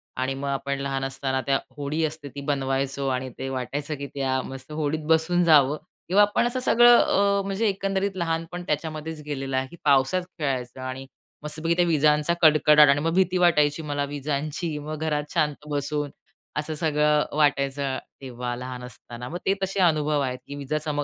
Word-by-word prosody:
आणि 130 Hz, +1 st, -1 dB
मग 140 Hz, +1 st, -5 dB
आपण 140 Hz, 0 st, -2 dB
लहान 135 Hz, -1 st, -2 dB
असताना 135 Hz, 0 st, -2 dB
त्या 135 Hz, -1 st, +3 dB, 0.2 s
होडी 145 Hz, +3 st, -2 dB
असते 150 Hz, -2 st, -5 dB
ती 140 Hz, -, -5 dB
बनवायचो 135 Hz, 0 st, -1 dB
आणि 130 Hz, 0 st, -1 dB
ते 135 Hz, -, -4 dB
वाटायचं, 140 Hz, +4 st, -3 dB
की 140 Hz, 0 st, -6 dB
त्या 130 Hz, -1 st, 0 dB
मस्त 135 Hz, +2 st, -9 dB
होडीत 150 Hz, 0 st, -2 dB
बसून 165 Hz, +2 st, +3 dB
जावं 150 Hz, -3 st, +5 dB, 0.3 s
किंवा 195 Hz, +4 st, +4 dB
आपण 205 Hz, +3 st, +3 dB
असं 255 Hz, +1 st, -2 dB
सगळं 240 Hz, -1 st, +6 dB
अ, 200 Hz, 0 st, +3 dB
म्हणजे 200 Hz, +3 st, 0 dB
एकंदरीत 195 Hz, 0 st, -1 dB
लहानपण 165 Hz, +1 st, -3 dB
त्याच्यामध्येच 155 Hz, +1 st, -3 dB
गेलेलं 135 Hz, -2 st, -3 dB
आहे, 130 Hz, 0 st, -1 dB
की 170 Hz, -, -13 dB
पावसात 140 Hz, +5 st, +3 dB, 0.2 s
खेळायचं 130 Hz, -3 st, -3 dB
आणि 130 Hz, +1 st, -5 dB, 0.4 s
मस्तपैकी 160 Hz, +2 st, -1 dB
त्या 175 Hz, 0 st, +3 dB
विजांचा 150 Hz, 0 st, +3 dB
कडकडाट 150 Hz, -2 st, +6 dB
आणि 140 Hz, +1 st, +4 dB
मग 165 Hz, +1 st, 0 dB
भीती 185 Hz, 0 st, +2 dB
वाटायची 160 Hz, -4 st, +3 dB
मला 145 Hz, -2 st, -2 dB
विजांची. 150 Hz, +2 st, -3 dB
मग 155 Hz, +1 st, -5 dB
घरात 150 Hz, -2 st, -1 dB
शांत 150 Hz, 0 st, 0 dB
बसून 145 Hz, 0 st, -2 dB, 0.5 s
असं 150 Hz, +1 st, -2 dB
सगळं 150 Hz, -1 st, +2 dB
वाटायचं 140 Hz, -2 st, +1 dB, 0.2 s
तेव्हा 125 Hz, -2 st, -5 dB
लहान 125 Hz, 0 st, -7 dB
असताना. 120 Hz, 0 st, -9 dB
मग 175 Hz, -, -4 dB
ते 195 Hz, -, +3 dB
तसे 195 Hz, +1 st, -2 dB
अनुभव 155 Hz, -3 st, +2 dB
आहेत, 125 Hz, -2 st, -2 dB
की 140 Hz, -, -7 dB
विजा 145 Hz, +1 st, -2 dB
चमक, 150 Hz, -1 st, -2 dB
150 Hz, 175 wpm, -25 LUFS, 135-160 Hz, 0.5 s, सगळं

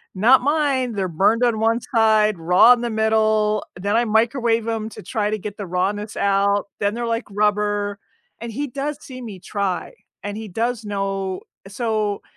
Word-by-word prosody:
not 240 Hz, +7 st, +5 dB
mine, 275 Hz, -4 st, +1 dB
they're 195 Hz, -2 st, -1 dB
burned 200 Hz, +8 st, +2 dB
on 230 Hz, -3 st, +2 dB
one 225 Hz, +1 st, +2 dB, 0.2 s
side, 215 Hz, -3 st, +3 dB
raw 180 Hz, +9 st, +6 dB
in 240 Hz, -, -2 dB
the 240 Hz, -, -2 dB
middle, 220 Hz, -1 st, +2 dB, 0.2 s
then 200 Hz, +3 st, 0 dB
I 235 Hz, -, +3 dB
microwave 230 Hz, +1 st, +1 dB
'em 225 Hz, -1 st, -2 dB
to -, -, -11 dB
try 210 Hz, +3 st, -1 dB
to 215 Hz, -, -1 dB
get 205 Hz, 0 st, -7 dB
the 200 Hz, -3 st, -6 dB
rawness 200 Hz, +4 st, -2 dB
out, 200 Hz, 0 st, +2 dB
then 205 Hz, +2 st, 0 dB
they're, 240 Hz, -, -3 dB
like, 230 Hz, +1 st, -2 dB
rubber, 205 Hz, 0 st, 0 dB, 0.4 s
and 235 Hz, -1 st, -5 dB
he 285 Hz, +6 st, -3 dB
does 280 Hz, +3 st, -4 dB
see 255 Hz, -1 st, -10 dB
me 210 Hz, -6 st, -8 dB
try, 195 Hz, -1 st, -3 dB, 0.3 s
and 205 Hz, 0 st, -4 dB
he 220 Hz, -, -6 dB
does 230 Hz, +4 st, -2 dB
know 195 Hz, -2 st, -3 dB, 0.3 s
So, 215 Hz, -1 st, -2 dB
215 Hz, 180 wpm, -21 LUFS, 200-230 Hz, 0.4 s, raw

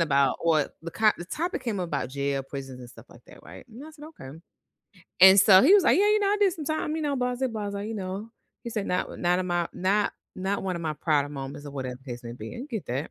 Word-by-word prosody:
about 140 Hz, -4 st, +2 dB
what 155 Hz, -3 st, +1 dB
the 170 Hz, -, -6 dB
co 215 Hz, +2 st, +3 dB
the 175 Hz, -, -6 dB
topic 345 Hz, -, -3 dB
came 210 Hz, -5 st, -2 dB
about 140 Hz, -7 st, -3 dB
jail, 140 Hz, 0 st, -2 dB
prisons, 135 Hz, -1 st, -8 dB
and 120 Hz, 0 st, -11 dB
stuff -, -, -15 dB
like -, -, -17 dB
that, -, -, -16 dB
right? -, -, -12 dB
And 245 Hz, +6 st, -11 dB
I -, -, -11 dB
said, 300 Hz, -1 st, -13 dB, 0.2 s
"Okay," 135 Hz, +4 st, -10 dB, 0.8 s
and 190 Hz, +1 st, +9 dB
so 190 Hz, -1 st, +7 dB
he 350 Hz, +9 st, +7 dB
was, 400 Hz, -3 st, +5 dB
like, -, -, +4 dB
"Yeah, 405 Hz, -, +4 dB
you 425 Hz, 0 st, +4 dB
know, 400 Hz, -1 st, +1 dB
I 415 Hz, -, +2 dB
did 390 Hz, -3 st, +4 dB
some 310 Hz, -, -7 dB
time, 310 Hz, 0 st, -2 dB
you 320 Hz, -, -3 dB
know," 290 Hz, -2 st, 0 dB
blasé, 250 Hz, 0 st, -2 dB
blasé, 205 Hz, -2 st, -4 dB
you 225 Hz, -, -5 dB
know. 195 Hz, +3 st, -5 dB, 0.3 s
He 235 Hz, -, -5 dB
said, 215 Hz, -3 st, -3 dB
"Not 180 Hz, -, -2 dB
not 175 Hz, +1 st, +2 dB
of 185 Hz, -, -2 dB
my 175 Hz, -1 st, -1 dB
not 200 Hz, +3 st, 0 dB, 0.2 s
not 195 Hz, +2 st, -2 dB
one 190 Hz, -1 st, -2 dB
of 170 Hz, -, -6 dB
my 155 Hz, -1 st, -2 dB
prouder 145 Hz, -2 st, 0 dB
moments 140 Hz, 0 st, -7 dB
or -, -, -7 dB
whatever 130 Hz, -3 st, -5 dB
case 120 Hz, -2 st, -8 dB
may 115 Hz, -, -6 dB
be." 110 Hz, -2 st, -8 dB
I 255 Hz, -, -7 dB
get 220 Hz, -6 st, -5 dB
that. 135 Hz, +6 st, -3 dB
185 Hz, 265 wpm, -26 LUFS, 140-235 Hz, 0.8 s, and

